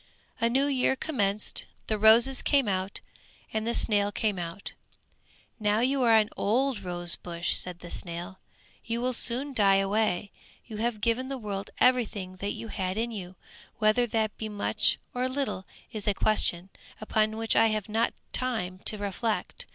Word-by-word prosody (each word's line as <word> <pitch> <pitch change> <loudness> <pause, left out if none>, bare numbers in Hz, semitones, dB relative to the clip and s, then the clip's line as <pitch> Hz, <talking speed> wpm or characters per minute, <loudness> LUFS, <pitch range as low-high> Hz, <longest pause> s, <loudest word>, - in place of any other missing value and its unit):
A 230 0 +2
new 265 +4 +2
year 265 -2 +2
commenced; 210 -9 -1 0.2
the 215 -1 -2
roses 235 +5 +6
came 275 -5 +2
out, 190 0 -2 0.5
and 220 +1 -1
the 235 - 0
snail 205 -1 +2
came 205 -2 -1
out. 170 +3 -6 0.9
"Now 210 +1 +2
you 265 +2 +2
are 230 -2 +5
an 215 0 +3
old 250 +3 +1
rose 175 -2 -1
bush," 170 0 -2
said 180 -1 -3
the 175 - -9
snail, 175 +2 -5 0.4
"you 230 0 -2
will 255 +1 0
soon 255 +4 -1
die 200 -5 +5
away. 200 0 +1 0.3
You 220 -3 -8
have 225 -1 -1
given 235 +4 +1
the 270 0 -4
world 200 -4 -5
everything 210 -7 +1
that 200 +2 -3
you 225 - -7
had 190 -1 -2
in 235 +1 -1
you; 185 -4 -7 0.4
whether 220 +2 +3
that 220 -1 -1
be 220 - -4
much 205 -1 +1 0.2
or 250 +1 -1
little 260 -8 -3 0.2
is 215 -2 -5
a 205 - +2
question, 190 -4 +1 0.3
upon 215 0 0
which 225 0 +1
I 225 - +6
have 215 -2 -1
not 225 +2 0 0.2
time 200 -8 -2
to 215 - +3
reflect. 205 +2 -3
215 Hz, 170 wpm, -28 LUFS, 195-235 Hz, 0.9 s, roses